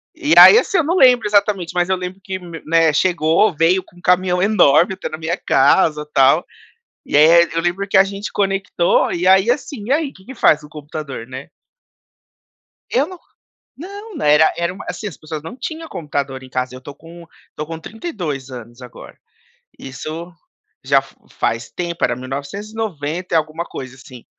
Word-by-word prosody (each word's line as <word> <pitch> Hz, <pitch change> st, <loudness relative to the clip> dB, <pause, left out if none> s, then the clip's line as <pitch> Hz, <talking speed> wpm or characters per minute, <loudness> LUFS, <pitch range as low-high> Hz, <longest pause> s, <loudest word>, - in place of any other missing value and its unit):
e -, -, 0 dB
aí, -, -, +10 dB
assim, 390 Hz, -, -1 dB
eu 330 Hz, -, +3 dB
não 335 Hz, +4 st, -1 dB
lembro 250 Hz, -7 st, +5 dB
exatamente, 200 Hz, -4 st, +1 dB
mas 175 Hz, 0 st, 0 dB
eu 190 Hz, -, +2 dB
lembro 180 Hz, +1 st, -7 dB
que, 190 Hz, -1 st, -5 dB, 0.3 s
né, 165 Hz, 0 st, +3 dB
chegou, 175 Hz, +3 st, +2 dB
veio 175 Hz, +4 st, +2 dB
com -, -, -24 dB
um -, -, -17 dB
caminhão 180 Hz, 0 st, +2 dB
enorme 190 Hz, -3 st, +4 dB
até -, -, -6 dB
na 155 Hz, -, -6 dB
minha 165 Hz, +3 st, -3 dB
casa 150 Hz, +2 st, +2 dB
tal, 135 Hz, +5 st, +4 dB, 0.6 s
e -, -, -1 dB
aí 170 Hz, +3 st, +6 dB
eu 165 Hz, -, +1 dB
lembro 175 Hz, +4 st, -2 dB
que 195 Hz, -, 0 dB
a 190 Hz, -, +7 dB
gente 200 Hz, +1 st, -6 dB
conectou 195 Hz, -3 st, 0 dB
e 175 Hz, +1 st, -2 dB
aí, 190 Hz, +4 st, +5 dB
assim: 250 Hz, -4 st, -3 dB
"E 260 Hz, -, 0 dB
aí, 295 Hz, -1 st, 0 dB
que 190 Hz, -, -19 dB
que 265 Hz, -, -10 dB
faz 150 Hz, -8 st, +3 dB
o 150 Hz, -, -13 dB
computador?", 150 Hz, -5 st, -8 dB
né. 130 Hz, +2 st, -9 dB, 1.4 s
Eu 275 Hz, +5 st, +1 dB
não 370 Hz, 0 st, -10 dB, 0.6 s
não 400 Hz, +5 st, -10 dB
não -, -, -4 dB
era 150 Hz, +1 st, +5 dB
era 170 Hz, +1 st, -2 dB
uma 190 Hz, -, -11 dB
assim, 215 Hz, -, -5 dB
as -, -, -9 dB
pessoas 155 Hz, -1 st, -7 dB
não 195 Hz, +11 st, -9 dB
tinha 320 Hz, +3 st, -6 dB
computador 140 Hz, -4 st, -5 dB
em 130 Hz, -, -13 dB
casa, 130 Hz, 0 st, -3 dB
eu -, -, -9 dB
estou 140 Hz, +2 st, -11 dB
com 170 Hz, +2 st, -14 dB, 0.2 s
estou 150 Hz, -, -7 dB
com 165 Hz, 0 st, -7 dB
32 165 Hz, -, -6 dB
anos 120 Hz, 0 st, -11 dB
agora, 125 Hz, -, -12 dB, 0.6 s
isso 155 Hz, +6 st, -8 dB, 0.5 s
já -, -, +3 dB
fa -, -, -18 dB
faz 115 Hz, 0 st, -3 dB
tempo 170 Hz, +7 st, -3 dB
era 120 Hz, -, 0 dB
1990 165 Hz, -, -5 dB
e -, -, +5 dB
alguma 155 Hz, +2 st, -3 dB
coisa, 130 Hz, -6 st, -9 dB
assim. 130 Hz, -2 st, -14 dB
170 Hz, 185 wpm, -18 LUFS, 150-200 Hz, 1.4 s, aí